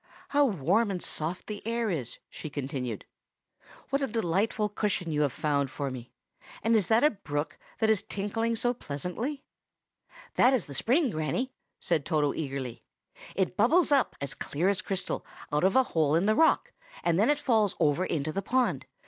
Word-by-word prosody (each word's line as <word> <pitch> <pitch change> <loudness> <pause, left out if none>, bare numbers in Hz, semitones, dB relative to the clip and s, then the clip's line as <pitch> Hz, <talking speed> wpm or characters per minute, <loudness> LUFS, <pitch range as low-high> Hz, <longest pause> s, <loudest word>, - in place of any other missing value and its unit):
How 290 0 +4
warm 200 - +2
and 190 -2 -2
soft 165 +1 -2
the 210 -1 -6
air 230 -1 -1
is!" 135 -9 -3
she 155 - -8
continued. 130 -6 -4 0.9
"What 275 +1 +1
a 275 - +1
delightful 210 0 0
cushion 205 -5 -1
you 150 -1 +1
have 145 -3 +2
found 140 0 0
for 140 0 -3
me! 125 -1 -8 0.5
and 225 +1 +3
is 205 -6 +3
that 225 +3 +4
a 300 - +6
brook, 150 -6 -4 0.2
that 220 - +2
is 210 -3 +3
tinkling 225 +3 -2
so 245 +2 +1
pleasantly?" 230 - -4 0.9
"That 260 +2 +6
is 235 - -1
the 140 - -8
spring, 255 - +2
Granny!" 180 +12 -2 0.3
said 165 -5 +1
Toto 150 -2 +1
eagerly. 135 -5 -4 0.5
"It 185 -1 0
bubbles 300 - +4
up, 275 -3 +3
as 140 +1 -3
clear 165 +7 -1
as 200 +1 +1
crystal, 195 -2 -2 0.3
out 150 - +2
of 190 +1 +3
a 260 - +6
hole 155 - +1
in 170 +4 +2
the 215 - +4
rock, 320 +8 +3 0.3
and 170 +1 +2
then 220 - +4
it 295 0 +3
falls 220 -6 +2
over 155 +2 +3
into 155 -4 -1
the 195 - -1
pool. 250 +5 +1
190 Hz, 180 wpm, -29 LUFS, 150-230 Hz, 0.9 s, a